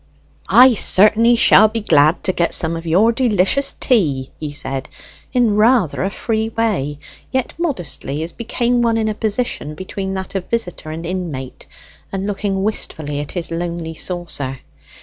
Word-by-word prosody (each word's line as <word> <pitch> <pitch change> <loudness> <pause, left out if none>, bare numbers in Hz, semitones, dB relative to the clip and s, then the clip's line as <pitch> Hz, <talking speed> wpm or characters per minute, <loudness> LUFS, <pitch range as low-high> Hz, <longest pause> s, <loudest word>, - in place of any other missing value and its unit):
"I 255 +1 +7
certainly 220 +3 +4
shall 215 -2 +6
be 225 +1 -4
glad 155 -4 +3
to 185 - 0
get 170 -1 +2
some 165 0 +1
of 165 0 -7
your 195 +8 +4
delicious 235 +2 +1
tea," 145 - +1
he 150 -2 -5
said 135 -2 -3 0.4
in 235 -4 +2
rather 215 - +3
a 190 - 0
free 220 +2 -2
way, 205 -11 -1 0.3
yet 260 -1 -2
modestly, 175 - -3
as 165 - -5
became 240 +4 -1
one 230 -1 +2
in 220 -1 0
a - - -1
position 210 -8 -2
between 190 +2 -5
that 190 -1 -5
of 190 -2 -4
visitor 180 -9 -3
and 160 +2 -6
inmate, 165 -8 -5 0.4
and 195 0 -3
looking 200 -1 -2
wistfully 155 -8 -3
at 145 - -6
his 175 -3 -4
lonely 170 -1 -4
saucer. 160 -7 -4
190 Hz, 160 wpm, -18 LUFS, 160-225 Hz, 0.4 s, I